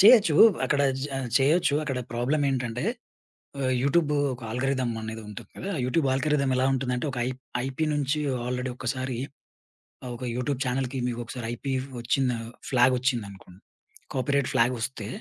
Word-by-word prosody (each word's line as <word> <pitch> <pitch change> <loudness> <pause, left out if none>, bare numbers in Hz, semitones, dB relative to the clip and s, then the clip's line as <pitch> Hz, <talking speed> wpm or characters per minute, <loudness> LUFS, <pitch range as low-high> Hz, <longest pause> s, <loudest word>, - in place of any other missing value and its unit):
చేయొచ్చు 205 -6 +8 0.3
అక్కడ 145 -1 +1 0.2
జ - - -1 0.3
చేయొచ్చు 150 +3 +3
అక్కడ 135 -4 -2
ప్రాబ్లమేంటంటే 130 0 0 0.8
ఆహ్, 130 -1 +1
యూట్యూబు 150 +1 +3 0.2
ఒక 125 - -10
ఆల్గోరిథం 130 0 0
అనేది 110 0 -5
ఉంటుంది 105 - -9
కదా! 195 +2 -4
యూట్యూబ్ 140 +3 +1
ఆల్గోరిథం 140 0 +1
ఎలా 130 +1 +2
ఉంటుందంటే, 125 +1 -1
ఒక 125 - -6
ఐప్ 130 0 -4 0.3
ఐపీ 135 +4 -2
నుంచి 145 +1 0 0.3
ఆల్రెడీ 125 +1 -2
ఒకసారి 130 0 -2 0.9
ఆహ్, 125 - -5
ఒక 125 - -8
యూట్యూబ్ 125 +1 -1
చానెల్‌కి 130 +1 -1
మీకొకసారి 120 0 -4
ఐపీ 135 +3 -4 0.3
వచ్చింద 125 +2 +1 0.4
ఫ్లాగొచ్చిందనుకోండి 120 -7 +1 0.5
కాపీరైట్ 140 +1 +1
ఫ్లాగొస్తే 115 -2 0
130 Hz, 130 wpm, -27 LUFS, 125-140 Hz, 0.9 s, చేయొచ్చు